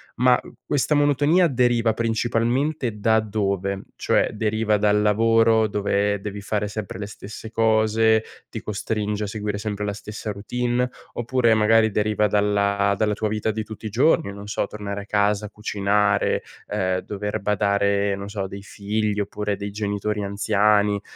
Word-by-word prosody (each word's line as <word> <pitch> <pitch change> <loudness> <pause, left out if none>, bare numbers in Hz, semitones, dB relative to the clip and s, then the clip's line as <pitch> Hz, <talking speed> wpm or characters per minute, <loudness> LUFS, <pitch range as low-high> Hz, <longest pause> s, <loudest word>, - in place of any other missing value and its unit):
ma 125 0 +4 0.3
questa 145 +1 +1
monotonia 145 +4 +3
deriva 120 -4 +2
principalmente 120 +2 0
da 110 +1 +3
dove? 100 -2 -2
Cioè, - - +1
deriva 110 0 +1
dal 105 0 +2
lavoro 115 +1 +4
dove 100 0 0
devi 100 0 -6
fare 105 0 -2
sempre 100 -2 -6
le 105 - -4
stesse 105 +2 -9
cose, 110 0 +3 0.3
ti 110 - -6
costringe 105 0 -2
a 105 - -2
seguire 105 0 -3
sempre 105 -1 -3
la 105 - -2
stessa 105 +1 -6
routine, 120 +4 -1 0.3
oppure 120 -1 +2
magari 110 +1 +4
deriva 105 +1 +1
dalla 100 -1 +2
dalla 105 0 +1
tua 110 +1 -2
vita 105 +1 -1
di 110 0 -3
tutti 110 0 -10
i - - -4
giorni, 115 -3 +2
non 100 0 -9
so, 105 -1 -1
tornare 100 -1 -5
a 100 - -10
casa, 105 0 +1
cucinare, 105 -1 0 0.2
ehm, 95 -3 0
dover 105 +2 -4
badare, 100 0 +1
non 100 +1 -7
so, 105 -1 -4
a 95 - -2
dei 100 +1 -8
figli 105 +1 -2
oppure 105 0 -2
dei 100 0 -5
genitori 105 0 -2
anziani, 105 0 +2
105 Hz, 155 wpm, -23 LUFS, 100-110 Hz, 0.3 s, ma